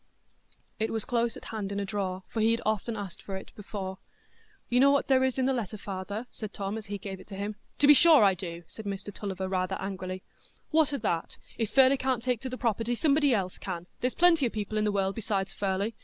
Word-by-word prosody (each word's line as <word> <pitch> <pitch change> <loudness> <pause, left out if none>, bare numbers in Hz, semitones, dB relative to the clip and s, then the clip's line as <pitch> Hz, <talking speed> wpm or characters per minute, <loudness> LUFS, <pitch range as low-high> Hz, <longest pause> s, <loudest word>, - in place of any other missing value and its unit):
It 220 - 0
was 225 -2 -2
close 235 -1 0
at - - -12
hand 210 -3 -4
in 200 - -2
a 200 - -1
drawer, 190 -2 -3
for 225 - -4
he 220 - +4
had 230 +1 +2
often 220 +2 0
asked 200 -4 -6
for 195 - -6
it 190 - -7
before. 195 -2 -6 0.7
"You 245 - +2
know 275 +2 +7
what 280 0 +3
there 260 -1 +4
is 260 -1 +1
in 260 - +2
the 270 - +2
letter, 220 -4 -3
father?" 200 +3 -5
said 215 -2 -7
Tom, 200 +1 -3
as 220 -2 -6
he 205 0 -3
gave 195 -1 -7
it - - -14
to 200 - -8
him. 205 +2 -3 0.2
"To 290 - +4
be 295 - +10
sure 310 -4 +7
I 195 -1 +6
do," 170 -2 -6
said 220 - -10
Mr 200 +1 -5
Tulliver, 190 -2 -4
rather 185 0 0
angrily. 185 -1 -4 0.5
"What 310 -2 +4
o' 280 - 0
that? 170 -8 -2 0.2
If 225 -3 0
Furley 270 0 +6
can't 255 -3 0
take 250 -3 0
to 260 - -4
the 255 - -5
property, 230 0 0
somebody 290 +1 +3
else 190 -6 0
can; 175 -3 -5
there's 250 +1 0
plenty 335 -6 +5
o' - - -2
people 215 -1 -2
in 210 - +1
the 210 - +2
world 195 -1 +1
besides 195 -3 -2
Furley. 200 +2 -1
210 Hz, 245 wpm, -29 LUFS, 195-245 Hz, 0.7 s, be